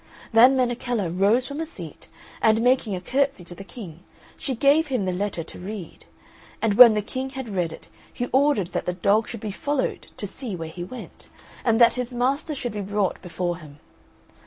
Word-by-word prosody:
Then 250 +4 +7
Menechella 245 -5 0
rose 205 +8 +3
from 285 +1 -6
her 325 - -1
seat, 325 - -9 0.3
and, 220 +1 +4
making 245 -5 +2
a - - -3
curtsey 270 0 0
to 175 - -9
the 195 - -9
King, 180 -4 -10 0.4
she 265 - -3
gave 285 +6 +4
him 250 -8 -1
the 185 - 0
letter 190 -2 -2
to - - -11
read; 195 -1 -8 0.5
and 225 -2 +1
when 235 0 +9
the 210 - 0
King 260 +5 -4
had 265 -2 -6
read 180 -6 -1
it - - -11 0.2
he 245 - -3
ordered 265 - +3
that - - -3
the 180 - 0
dog 200 +5 +2
should 230 -3 -7
be 215 - -4
followed 285 +6 -2
to - - -4
see 215 +1 -5
where 165 -2 -6
he 175 +2 -7
went, 245 +8 -10 0.4
and 230 -1 +2
that 235 -1 +7
his 250 0 -4
master 275 +5 0
should 245 -4 -4
be 210 - -3
brought 200 -1 -1
before 175 -1 -3
him. 150 -4 -13
225 Hz, 205 wpm, -24 LUFS, 185-255 Hz, 0.5 s, when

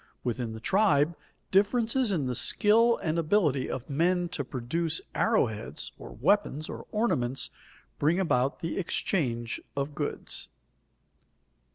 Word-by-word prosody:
Within 120 -2 -2
the 110 - -7
tribe, 165 - +3 0.4
differences 225 +4 +3
in 160 -8 0
the 125 - -1
skill 225 - +4
and 165 -1 0
ability 155 -6 +2
of 130 0 -5
men 175 +4 +1
to 145 - -3
produce 135 - -1
arrow - - +3
heads - - -6
or - - -9
weapons 155 -7 +1
or - - -8
ornaments, 135 - 0 0.5
bring 160 +5 +2
about 135 -6 +1
the 165 - -2
exchange 125 - -1 0.2
of 140 +1 -2
goods. 145 0 -4
160 Hz, 130 wpm, -28 LUFS, 130-195 Hz, 0.5 s, skill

